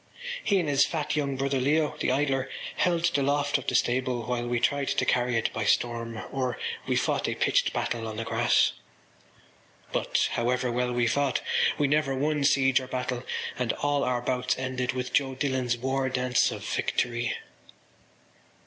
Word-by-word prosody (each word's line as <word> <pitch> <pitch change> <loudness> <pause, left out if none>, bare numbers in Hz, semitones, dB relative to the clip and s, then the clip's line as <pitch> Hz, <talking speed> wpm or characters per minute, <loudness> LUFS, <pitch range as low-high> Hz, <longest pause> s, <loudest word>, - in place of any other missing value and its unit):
He 200 -2 +3
and 170 - -1
his 140 -1 +4
fat 155 -2 -1
young 140 -3 -1
brother 135 0 0
Leo, 150 +3 +1
the - - +1
idler, 135 -1 0 0.3
held 170 -3 +2
the 140 - +2
loft 145 +1 +1
of 130 - -11
the 125 - 0
stable 125 0 +1
while 120 +1 -2
we 120 0 0
tried 140 +2 +1
to - - +1
carry 125 -1 +1
it 115 - -1
by 110 - -2
storm; 115 0 0
or 130 -3 -2 0.3
we - - +1
fought - - 0
a - - -2
pitched - - +2
battle 115 -2 -2
on 110 -1 -6
the 115 - -2
grass. 115 - +3 1.2
But, - - +1
however 125 +1 0
well 125 +1 0
we 120 0 +1
fought, 140 +4 +1 0.4
we 145 - +2
never 145 -1 +1
won 150 +2 0
siege 135 -2 +4
or 130 - -7
battle 125 -1 -3 0.4
and 125 -3 0
all 145 -1 0
our 125 -1 0
bouts 125 0 0
ended 130 -1 -2
with 125 0 -4
Joe 135 -2 +1
Dillon’s 130 -3 0
war 130 +2 -1
dance 125 -1 +2
of - - -6
victory. 120 -1 -1
130 Hz, 175 wpm, -27 LUFS, 120-140 Hz, 1.2 s, his